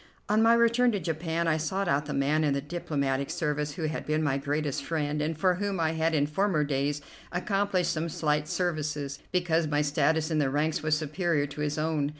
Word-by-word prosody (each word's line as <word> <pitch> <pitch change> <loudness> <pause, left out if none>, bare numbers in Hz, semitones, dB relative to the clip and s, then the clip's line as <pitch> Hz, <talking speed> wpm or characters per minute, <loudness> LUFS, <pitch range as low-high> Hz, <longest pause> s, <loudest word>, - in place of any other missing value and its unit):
On 215 +1 +3
my 230 +1 +6
return 235 +1 +4
to 205 - 0
Japan 165 0 -2
I 155 -1 +3
sought 190 +5 -1
out 145 -2 +1
the 150 - -3
man 145 +3 +2
in 145 -2 +2
the - - 0
diplomatic 140 -3 -2
service 150 -3 -1
who 165 - -5
had 155 0 -2
been 155 +1 +1
my 140 -2 +1
greatest 145 0 -2
friend 150 -2 -1
and 155 +1 -2
for 185 +3 +3
whom 195 0 -2
I 160 -1 +2
had 160 0 0
in 145 -1 +3
former 155 +1 +1
days 145 +1 -1 0.3
accomplished 195 0 0
some 165 +1 -2
slight 150 -1 0
services, 150 -6 -2
because 170 -3 +1
my 150 0 +1
status 155 +2 +1
in 155 - +2
the 140 -2 +2
ranks 150 +3 0
was 155 0 +2
superior 155 0 0
to 145 +1 -7
his 150 0 -1
own. 155 -2 0
155 Hz, 210 wpm, -28 LUFS, 145-170 Hz, 0.3 s, my